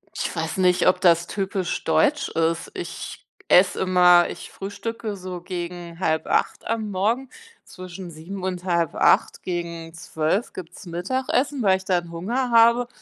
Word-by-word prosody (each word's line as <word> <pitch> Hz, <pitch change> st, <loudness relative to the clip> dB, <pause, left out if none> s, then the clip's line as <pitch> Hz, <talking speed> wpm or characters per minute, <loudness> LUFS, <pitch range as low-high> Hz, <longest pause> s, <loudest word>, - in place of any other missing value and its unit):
Ich -, -, -3 dB
weiß -, -, -3 dB
nicht, 180 Hz, -1 st, +3 dB
ob 185 Hz, -, +3 dB
das 170 Hz, -2 st, +4 dB
typisch 195 Hz, -2 st, -3 dB
deutsch 160 Hz, -, +2 dB
ist. 165 Hz, 0 st, -1 dB
Ich -, -, -7 dB, 0.2 s
esse 180 Hz, +1 st, +5 dB
immer 180 Hz, -2 st, +5 dB
ich -, -, -9 dB
frühstücke 205 Hz, +2 st, -5 dB
so 185 Hz, -2 st, -7 dB
gegen 175 Hz, -1 st, -6 dB
7:30 160 Hz, -4 st, 0 dB
am 220 Hz, -2 st, -2 dB
Morgen, 225 Hz, +8 st, 0 dB, 0.3 s
zwischen 180 Hz, -1 st, -9 dB
7:00 175 Hz, +5 st, -8 dB
und 180 Hz, -1 st, -3 dB
7:30, 170 Hz, -3 st, +2 dB
gegen 170 Hz, -2 st, -5 dB
12:00 165 Hz, +4 st, -2 dB
gibt's 185 Hz, +3 st, -10 dB
Mittagessen, 255 Hz, -, -1 dB
weil 190 Hz, -2 st, +4 dB
ich 190 Hz, -, -13 dB
dann 175 Hz, -3 st, -1 dB
Hunger 235 Hz, +10 st, -2 dB
habe, 235 Hz, +1 st, +5 dB
185 Hz, 145 wpm, -23 LUFS, 170-205 Hz, 0.3 s, esse